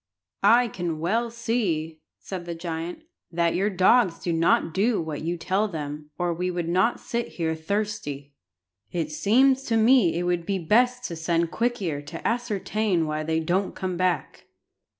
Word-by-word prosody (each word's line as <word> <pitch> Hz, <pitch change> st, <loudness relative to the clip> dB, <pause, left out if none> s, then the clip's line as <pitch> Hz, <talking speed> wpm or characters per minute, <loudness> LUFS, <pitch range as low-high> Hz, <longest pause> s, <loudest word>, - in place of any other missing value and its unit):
"I 235 Hz, +5 st, +5 dB
can 175 Hz, -6 st, -3 dB
well 225 Hz, +9 st, 0 dB
see," 190 Hz, -10 st, -2 dB, 0.2 s
said 185 Hz, -3 st, -7 dB
the 170 Hz, -1 st, -5 dB
giant, 165 Hz, -, -5 dB, 0.3 s
"that 170 Hz, 0 st, +1 dB
your 195 Hz, +3 st, +1 dB
dogs 190 Hz, 0 st, +4 dB
do 170 Hz, -, -2 dB
not 165 Hz, 0 st, +2 dB
do 215 Hz, +4 st, +2 dB
what 160 Hz, -3 st, -4 dB
you 170 Hz, +2 st, -2 dB
tell 190 Hz, +5 st, 0 dB
them, 150 Hz, -4 st, -6 dB
or 175 Hz, -1 st, 0 dB
we 180 Hz, +2 st, -2 dB
should 175 Hz, -2 st, -3 dB
not 185 Hz, +7 st, +2 dB
sit 235 Hz, 0 st, -3 dB
here 160 Hz, -2 st, 0 dB
thirsty. 160 Hz, -5 st, -3 dB, 0.6 s
It 160 Hz, -3 st, -2 dB
seems 255 Hz, -, +3 dB
to 225 Hz, -4 st, +1 dB
me 225 Hz, -7 st, +4 dB
it 175 Hz, -, -1 dB
would 175 Hz, -1 st, 0 dB
be 195 Hz, -, 0 dB
best 245 Hz, +8 st, +2 dB
to 170 Hz, -, -4 dB
send 165 Hz, +1 st, 0 dB
Quick 240 Hz, -2 st, -1 dB
ear 150 Hz, -5 st, -2 dB
to 145 Hz, -, -5 dB
ascertain 215 Hz, -5 st, 0 dB
why 155 Hz, 0 st, -2 dB
they 160 Hz, +1 st, 0 dB
don't 185 Hz, +4 st, 0 dB
come 185 Hz, -1 st, -3 dB
back." 175 Hz, -5 st, -1 dB
175 Hz, 170 wpm, -25 LUFS, 165-215 Hz, 0.6 s, I